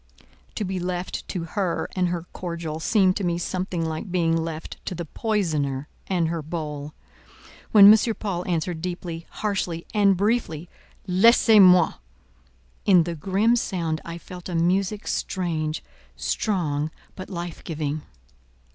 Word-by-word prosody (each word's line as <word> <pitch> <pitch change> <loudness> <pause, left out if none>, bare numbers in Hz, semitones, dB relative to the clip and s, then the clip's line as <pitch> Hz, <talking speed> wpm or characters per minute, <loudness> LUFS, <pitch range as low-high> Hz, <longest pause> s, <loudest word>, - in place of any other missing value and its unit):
To 210 - -2
be 190 0 -2
left 180 0 -4
to 180 -4 -3
her 175 +1 -2
and 185 -1 +2
her 175 -1 -3
cordial 170 -3 -4
seemed 190 +1 +3
to 205 - -3
me 170 -1 0
something 180 -1 -2
like 160 +4 -4
being 165 -2 +2
left 160 -1 -4
to 185 - -2
the 170 0 -4
poisoner 155 - -1 0.2
and 175 -4 +1
her 165 -1 -2
bowl. 150 -2 -5 0.8
When 205 -1 +10
M. 220 +1 +2
Paul 185 -4 -3
answered 170 -1 -1
deeply, 175 -2 -5
harshly, 180 -5 -2
and 200 -3 +4
briefly—"Laissez 205 +2 +2
moi!" 180 -3 +7 0.9
in 180 -4 +6
the 170 +1 -3
grim 195 +8 +2
sound 170 -8 -2
I 170 0 -6
felt 180 +1 -10
a 175 - -3
music 190 +5 +1
strange, 160 -4 -2 0.3
strong, 155 -8 -1 0.3
but 185 - -8
life 175 -3 -6
giving. 155 -2 -3
175 Hz, 140 wpm, -24 LUFS, 165-190 Hz, 0.9 s, When